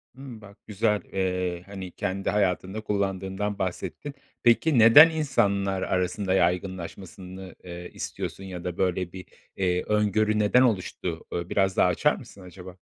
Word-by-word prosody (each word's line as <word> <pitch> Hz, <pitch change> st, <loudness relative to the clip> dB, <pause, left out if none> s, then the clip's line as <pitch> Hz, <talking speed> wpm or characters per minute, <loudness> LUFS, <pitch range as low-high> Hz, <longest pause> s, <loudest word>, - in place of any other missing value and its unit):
Hımm, 130 Hz, -4 st, -10 dB
bak 100 Hz, -1 st, -14 dB
güzel. 105 Hz, 0 st, 0 dB
Eee, 90 Hz, -2 st, -1 dB
hani, 95 Hz, -2 st, -8 dB
kendi 95 Hz, +2 st, -3 dB
hayatında 95 Hz, +1 st, 0 dB
kullandığımdan 100 Hz, 0 st, -2 dB
bahsettin. 95 Hz, -, -4 dB, 0.3 s
Peki, 120 Hz, +4 st, +4 dB
neden 115 Hz, +9 st, +9 dB
insanlar 100 Hz, -11 st, 0 dB
arasında 95 Hz, +1 st, -1 dB
yaygınlaşmasını, 95 Hz, +1 st, -3 dB
eee, 90 Hz, 0 st, -8 dB
istiyorsun 95 Hz, -, -6 dB
ya 90 Hz, -2 st, -7 dB
da 90 Hz, -1 st, -4 dB
böyle 90 Hz, -1 st, -1 dB
bir, 95 Hz, -1 st, -8 dB, 0.3 s
eee, 90 Hz, -1 st, 0 dB
öngörü 105 Hz, 0 st, +1 dB
neden 105 Hz, +4 st, +4 dB
oluştu? 90 Hz, -7 st, -1 dB
Ö 85 Hz, 0 st, -4 dB
biraz 95 Hz, -1 st, +1 dB
daha -, -, +5 dB
açar 140 Hz, +12 st, +2 dB
mısın 110 Hz, -5 st, -13 dB
acaba? 90 Hz, 0 st, -11 dB
95 Hz, 140 wpm, -26 LUFS, 90-105 Hz, 0.3 s, neden